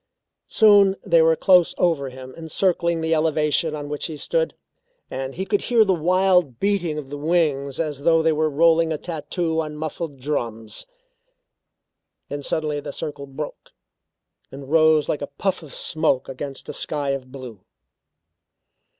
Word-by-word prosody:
Soon 205 -3 +5
they 165 -1 +4
were 160 0 +4
close 180 0 +4
over 160 -6 +1
him 130 0 -11
encircling 170 +1 0
the 160 0 0
elevation 155 0 +1
on 145 -1 -6
which 145 0 -3
he 160 -2 -7
stood, - - -1 0.6
and 135 0 -5
he 190 - -3
could 205 0 0
hear 230 -3 +3
the 195 - +2
wild 180 -5 +2
beating 190 -6 0
of 140 -2 -7
the 145 - -5
wings 145 -4 0
as 150 -4 -2
though 165 +1 +3
they 160 - +3
were 155 0 +1
rolling 165 +2 +3
a 155 - -1
tattoo 160 +1 -2
on 155 -1 -6
muffled 155 -1 -5
drums. 115 - -4 1.4
Then 145 0 -4
suddenly 150 +1 -2
the 145 0 -6
circle 140 -1 -6
broke, 140 +2 -8 0.8
and 135 +1 -10
rose 155 -1 +4
like 150 - -2
a 145 - -3
puff 190 -2 -1
of 155 -4 -12
smoke 155 -5 0
against 135 +1 -7
a - - -5
sky 145 -2 -1
of 130 -2 -5
blue. 125 -8 -10
155 Hz, 160 wpm, -22 LUFS, 140-170 Hz, 1.4 s, Soon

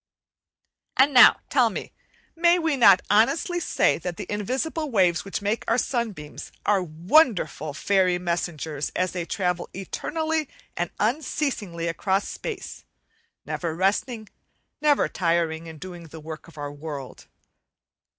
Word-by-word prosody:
And 275 +2 +5
now, 250 - +8
tell - - +4
me, - - -6 0.4
may 340 +1 +4
we 325 -4 +1
not 200 -8 +6
honestly 330 - +3
say, - - +1
that 180 -2 -5
the - - -5
invisible 270 - -2
waves 180 -8 +2
which 200 +1 -5
make 210 +3 -1
our 230 - +2
sunbeams, 220 - -3
are 200 -2 +3
wonderful 170 - +2
fairy 185 +4 +2
messengers 170 -4 -3
as 185 0 0
they 175 -2 -4
travel 180 -1 -2
eternally 315 - -2 0.3
and 175 -1 -2
unceasingly 220 - -1
across 190 +4 0
space, - - -6 0.6
never 165 -2 -3
resting, 210 +5 0 0.5
never 295 -2 +3
tiring 165 -2 -1
in 160 -1 -9
doing 175 0 -9
the 160 +1 -10
work 155 0 -9
of 165 - -16
our 145 -1 -5
world? 145 -2 -8
185 Hz, 130 wpm, -25 LUFS, 165-250 Hz, 0.6 s, now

